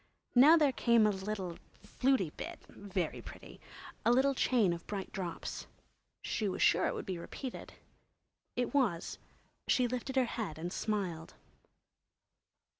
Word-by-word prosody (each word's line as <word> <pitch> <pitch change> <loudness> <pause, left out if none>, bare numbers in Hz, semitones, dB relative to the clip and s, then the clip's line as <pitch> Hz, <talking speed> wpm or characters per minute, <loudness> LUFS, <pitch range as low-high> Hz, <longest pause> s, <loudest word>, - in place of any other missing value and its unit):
Now 290 +7 +8
there 295 -4 +4
came 235 -3 +4
a 210 - +4
little 190 -3 -4 0.3
"flutey" 255 - +1
bit—very 190 -5 -5
pretty!—a 235 - -6
little 265 +3 +4
chain 235 -8 +3
of 170 0 -8
bright 200 -2 -4
drops. 180 -4 -5 0.6
She 210 -3 -1
was - - -4
sure 175 - +4
it - - -2
would - - -5
be 185 -3 -4
repeated. 255 +8 -7 0.8
It 245 +1 -1
was; 235 -12 0 0.5
she 250 -1 +3
lifted 250 +2 -4
her 260 -1 +4
head 210 -10 -4
and 175 +3 -4
smiled. 185 -7 -3
215 Hz, 130 wpm, -33 LUFS, 180-250 Hz, 0.8 s, Now